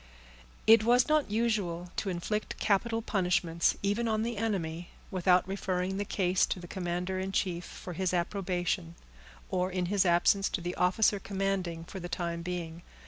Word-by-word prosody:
It 225 0 +7
was 245 +2 +4
not 305 -4 +2
usual 200 -6 -1
to 200 - -1
inflict 190 +4 -3
capital 225 +3 +1
punishments, 180 -5 +1
even 205 +4 +1
on 220 -1 +1
the 235 0 -2
enemy, 175 -6 -2 0.2
without 185 -1 +3
referring 190 -1 -2
the 205 - -1
case 185 -2 +2
to - - -2
the 175 - -9
commander 180 +1 -2
in 190 +1 -3
chief, 180 -2 -1
for 180 - -8
his 185 +1 0
approbation; 175 - -1 0.6
or, 185 0 +1
in 180 -1 -1
his 200 -2 +4
absence, 180 +3 +3
to 185 - -2
the 175 +1 -3
officer 195 +3 +2
commanding 190 -4 -2
for 190 - -8
the 175 0 -6
time 170 -1 -3
being. 170 -1 -5
185 Hz, 165 wpm, -30 LUFS, 175-205 Hz, 0.6 s, It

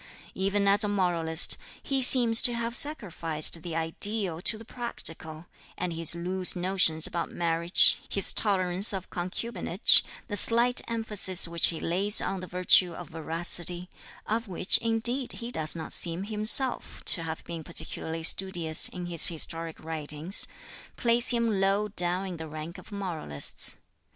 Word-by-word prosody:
Even 200 +1 -2
as 200 +2 +3
a - - -2
moralist, 175 -5 +1 0.3
he 275 -1 -2
seems 240 -3 +5
to 240 - +2
have 235 0 -4
sacrificed 170 - 0
the 165 0 -8
ideal 170 +2 -4
to 215 - -1
the 225 - -14
practical, 165 -10 -9 0.3
and 180 -1 -5
his 165 0 +3
loose 185 +2 -1
notions 175 -3 0
about 170 - -5
marriage, 170 +1 0
his 195 - +3
tolerance 190 -1 +3
of 190 -2 -7
concubinage, 185 +1 0 0.2
the 205 - -5
slight 235 +4 +4
emphasis 210 -6 0
which 170 0 0
he 165 - -5
lays 195 +5 +2
on 190 +1 -2
the 185 - -10
virtue 180 0 +1
of 175 +1 -11
veracity 175 +2 +2 0.4
of 225 +2 -4
which 185 0 +2
indeed 235 +3 0
he 235 0 -9
does 155 -7 0
not 160 -1 -3
seem 170 +2 +3
himself 215 +5 0
to 170 - +2
have 160 -1 -7
been 165 -2 -9
particularly 160 0 -6
studious 170 -2 +4
in 180 -1 -9
his 170 -2 +6
historic 165 0 -3
writings 160 +2 -2 0.5
place 235 0 +3
him 230 -5 -2
low 200 +2 -1
down 180 0 -2
in 180 -3 -8
the 160 0 -9
rank 155 +4 -10
of 185 - -17
moralists. 170 - 0
180 Hz, 150 wpm, -26 LUFS, 165-210 Hz, 0.5 s, his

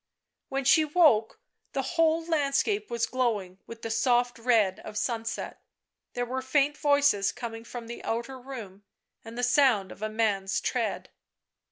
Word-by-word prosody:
When 275 0 -2
she 315 +4 +6
woke 295 -9 +3 0.3
the 270 - -1
whole 325 +3 +1
landscape 325 +7 0
was 235 0 0
glowing 215 -8 -2
with 230 0 -10
the 225 - -3
soft 245 +1 +1
red 225 -5 +2
of 210 -1 -8
sunset. 225 0 -3 0.5
There 245 - -2
were 260 +2 -3
faint 280 +2 +1
voices 285 -9 +3
coming 225 -2 -7
from 235 0 -8
the 235 +1 -8
outer 235 +3 -3
room, 230 -7 -9 0.4
and 225 +1 -10
the 245 - -2
sound 245 -7 +3
of - - -12
a 215 - -2
man's 205 -3 0
tread. - - -2
245 Hz, 155 wpm, -28 LUFS, 225-275 Hz, 0.5 s, she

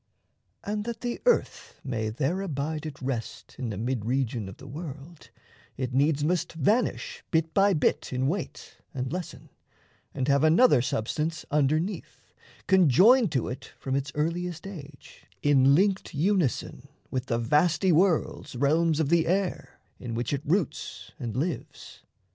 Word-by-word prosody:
And 210 0 -2
that 235 -1 -5
the 240 -1 -3
earth 485 - 0
may 110 -5 -2
there 150 - -1
abide 155 -2 -3
at 145 - -9
rest 125 -4 -5
In 125 -3 -3
the 105 - -4
mid 120 +1 -2
region 120 -4 -1
of 95 - -11
the - - -13
world, 150 +2 -9 0.5
it 130 -1 -3
needs 145 +2 +2
Must 170 +1 0
vanish 250 - 0
bit 160 -1 0
by 200 -1 +4
bit 150 - 0
in 130 0 -1
weight 170 +5 -4 0.2
and 130 +2 -3
lessen, 180 -1 -6 0.7
And 130 - -1
have 140 0 +3
another 160 - +5
substance 150 +8 -2
underneath, 155 +6 -1 0.3
Conjoined 190 - +5
to 130 - 0
it 125 +2 -7
from 135 0 -3
its 140 0 -2
earliest 170 +3 -2
age 155 -8 -11 0.2
In 140 -1 +5
linked 195 -1 +1
unison 175 - 0 0.2
with 130 0 -2
the 115 - 0
vasty 150 +8 +2
world's 170 -5 +1
Realms 155 +4 +2
of 155 -3 +1
the 170 -1 +3
air 190 +1 -1 0.2
in 115 -3 -5
which 120 +4 -2
it 140 - -1
roots 145 - -2
and 120 -4 -4
lives. 160 +4 -5
150 Hz, 150 wpm, -27 LUFS, 130-180 Hz, 0.7 s, another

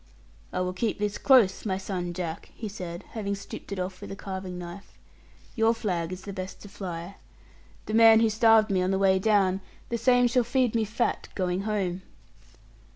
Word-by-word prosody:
'I - - -1
will 180 0 -1
keep 220 +4 -1
this 210 0 -2
close, 245 -9 +5
my 190 -3 -1
son 185 -2 -4
Jack,' 170 -2 -5
he 220 - -5
said, 180 -4 -7
having 200 -3 -3
stripped 195 - -9
it 200 - -3
off 185 0 -4
with - - -8
a - - -5
carving 190 -2 -6
knife; 175 +3 -9 0.6
'your 225 0 +3
flag 180 -6 -2
is 185 0 -7
the 200 - -6
best 185 0 -6
to - - -9
fly. 180 -1 -6 0.7
The 215 - -5
man 225 0 +8
who 225 -1 +4
starved 220 -1 +5
me 185 -1 +2
on 185 - +1
the 190 - +1
way 190 -1 +4
down, 195 -2 +2 0.3
the 235 - -2
same 245 +1 +4
shall 245 +1 +2
feed 245 0 +1
me 225 -2 +1
fat 230 +3 -1
going 180 -1 -1
home.' 190 -4 -1
195 Hz, 195 wpm, -27 LUFS, 185-220 Hz, 0.7 s, man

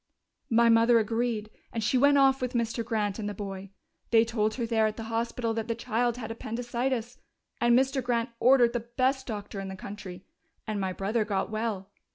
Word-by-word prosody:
"My 235 0 +4
mother 230 +1 +5
agreed, 225 -1 -1 0.2
and 225 - -3
she 235 - +1
went 285 +2 +5
off 270 -1 +4
with 250 0 -2
Mr. 230 -1 -1
Grant 215 -3 -1
and 205 -1 -3
the 205 - -6
boy. 195 -1 -6 0.4
They 225 -1 +5
told 220 -2 0
her 240 - -2
there 225 -1 +2
at 215 - -4
the 225 - -5
hospital 230 0 -1
that 225 0 -3
the 230 - -1
child 240 0 -1
had 225 -2 -5
appendicitis, 240 +2 -3 0.4
and 240 0 +4
Mr. 265 +1 +1
Grant 235 0 0
ordered 245 -2 +5
the 240 - 0 0.2
best 265 +1 +1
doctor 205 -3 -5
in 195 - -5
the 190 - -6
country.... 190 -1 -9 0.4
And 215 -2 -2
my 190 -1 -1
brother 205 +5 -1
got 205 0 -2
well! 215 -3 -3
230 Hz, 200 wpm, -28 LUFS, 215-240 Hz, 0.4 s, mother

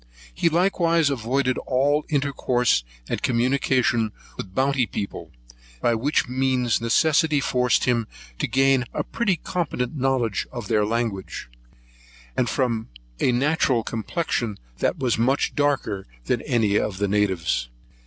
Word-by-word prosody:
He 170 - +2
likewise 170 -3 +2
avoided 130 +1 0
all 145 +4 +1
intercourse 130 - +1 0.2
and - - -2
communication 125 -2 +1 0.2
with - - -6
the - - -20
Bounty's 130 +2 +1
people, 100 - -5 0.5
by 120 - +2
which 135 +6 +1
means 125 -2 +1
necessity 155 +5 +3
forced 125 -2 +2
him 120 -3 +1 0.3
to - - 0
gain 135 -1 +3
a - - 0
pretty 210 -6 0
competent 155 -6 -3
knowledge 130 -6 0
of 120 -2 -6
their 105 -2 +2
language; 110 - -3 0.9
and 120 - +1
from 115 -4 -1 0.3
natural 130 -1 +2
complexion 115 -2 -2 0.4
was 125 -4 0
much 130 +4 +1
darker 135 -9 0 0.2
than - - 0
any 110 -4 +1
of 95 - -2
the 100 +1 0
natives. 95 -11 0
125 Hz, 125 wpm, -24 LUFS, 115-140 Hz, 0.9 s, necessity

